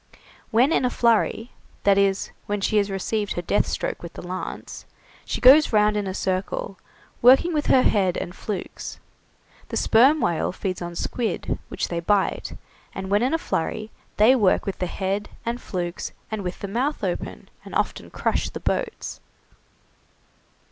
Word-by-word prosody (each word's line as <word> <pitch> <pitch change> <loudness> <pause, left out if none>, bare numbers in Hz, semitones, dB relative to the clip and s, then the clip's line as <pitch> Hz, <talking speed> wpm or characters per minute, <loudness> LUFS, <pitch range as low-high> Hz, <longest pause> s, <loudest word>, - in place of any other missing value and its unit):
When 245 +6 +4
in - - +2
a 250 - +3
flurry 235 0 +1 0.3
that 200 -1 +5
is, 195 -1 +1 0.2
when 205 0 -1
she 210 +2 +1
has 205 -1 +2
received 205 +2 -2
her 175 - -3
death 200 - +1
stroke - - -3
with 170 0 -8
the - - -9
lance 185 +1 -6 0.4
she - - -3
goes 280 +4 +7
round 210 -1 +4
in 205 -1 -1
a 190 - -3
circle, 190 0 -2 0.4
working 265 +8 +6
with 300 -1 0
her 255 - +5
head 190 -4 +2
and 175 - -4
flukes. 205 -1 -6 0.7
The - - -2
sperm 265 +8 +5
whales 170 - 0
feed 185 -3 -3
on 175 0 -5
squid, 225 +2 -2
which - - -3
they 170 - -2
bite, 195 +3 0 0.4
and 190 0 -5
when 205 +1 +4
in 260 +6 +2
a - - +2
flurry 215 - -3 0.3
they 225 +5 +6
work 205 -7 +3
with 195 - -4
the 180 - -1
head 195 +3 -2 0.2
and 235 +1 -2
flukes, 175 -2 -4 0.2
and 215 -1 -2
with 180 -1 -5
the 200 - -3
mouth 255 +9 -1
open, - - -4
and - - -9
often - - -1
crush - - -1
the - - -7
boats. 480 -3 -3
205 Hz, 170 wpm, -24 LUFS, 190-240 Hz, 0.7 s, goes